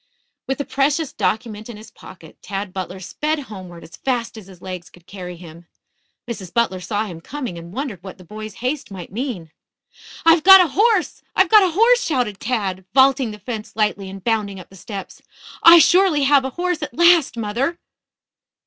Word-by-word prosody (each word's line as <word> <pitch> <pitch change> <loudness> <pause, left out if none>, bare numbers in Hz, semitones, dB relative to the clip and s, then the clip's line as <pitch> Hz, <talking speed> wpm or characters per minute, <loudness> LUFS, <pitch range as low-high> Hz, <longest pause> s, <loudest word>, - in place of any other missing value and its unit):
With 270 - -1
the 285 - -3
precious 280 +3 0
document 220 -1 -2
in 230 - -8
his 215 - -13
pocket, - - -15
Tad 195 -1 -5
Butler 185 0 -6
sped 300 - -2
homeward 185 -8 -10
as 160 - -13
fast 245 -4 -2
as 215 -4 -11
his 185 -3 -15
legs 180 -1 -8
could 175 -1 -20
carry 180 -2 -9
him. 170 0 -13 0.6
Mrs. 200 -7 -7
Butler 230 -6 0
saw 205 +4 -2
him 170 -5 -9
coming 255 - -6
and 170 0 -10
wondered 240 - -5
what 190 - -9
the 185 - -14
boy's 215 +3 -9
haste 275 +2 -2
might 185 -3 -9
mean. 210 - -5 0.7
"I've 330 0 +6
got 385 0 +10
a 360 -3 +3
horse! 420 - +1
I've 380 -2 +3
got 430 -1 +7
a 365 -4 +1
horse!" 485 +6 +4
shouted 245 - -1
Tad, 200 -6 -2
vaulting 265 -2 +4
the 210 - -8
fence 215 +1 -7
lightly 210 -3 -1
and 195 -1 -10
bounding 210 -4 -1
up 180 - -14
the - - -14
steps. 195 +1 -9 0.4
"I 335 +1 +9
surely 350 -3 +4
have 275 -1 +4
a - - -2
horse 355 -2 -1
at 295 - -6
last, 340 -7 +4
mother." 235 +10 -2
220 Hz, 190 wpm, -20 LUFS, 190-290 Hz, 0.7 s, got